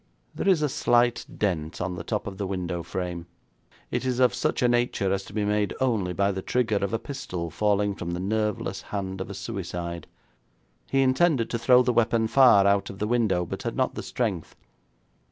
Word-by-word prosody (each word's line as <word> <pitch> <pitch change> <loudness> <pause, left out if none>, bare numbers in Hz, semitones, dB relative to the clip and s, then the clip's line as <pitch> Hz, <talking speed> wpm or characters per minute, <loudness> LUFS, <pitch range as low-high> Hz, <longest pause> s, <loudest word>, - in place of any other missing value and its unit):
'There - - -3
is 170 -5 +3
a - - +3
slight 120 -2 +2
dent 85 -6 -1
on 90 0 -2
the 85 - -6
top 105 +4 -2
of 95 -1 -7
the 100 - -2
window 90 -2 -3
frame. 85 0 -5 0.6
It - - -1
is 130 -1 -1
of 125 -1 +4
such - - -1
a - - +5
nature 120 -5 +1
as 95 0 -2
to - - -12
be 105 0 -1
made 105 0 0
only 110 -9 +1
by 100 +2 +1
the 95 -1 -4
trigger 115 -1 0
of 100 -1 -1
a 115 - +1
pistol 115 - -5
falling 105 -1 +1
from 85 -3 -6
the 85 0 -3
nerveless 105 +2 -1
hand 95 -2 -5
of 95 - -5
a 100 - -6
suicide. 85 -6 -5 0.8
He 135 0 +3
intended 130 -2 +2
to 115 - -1
throw 125 +1 +5
the 125 0 +1
weapon 115 -1 +2
far 115 -4 +6
out 100 0 +2
of 95 - -8
the 105 - -1
window, 105 -6 +1
but - - -6
had - - -3
not - - 0
the - - -5
strength. - - -3
105 Hz, 210 wpm, -26 LUFS, 95-120 Hz, 0.8 s, far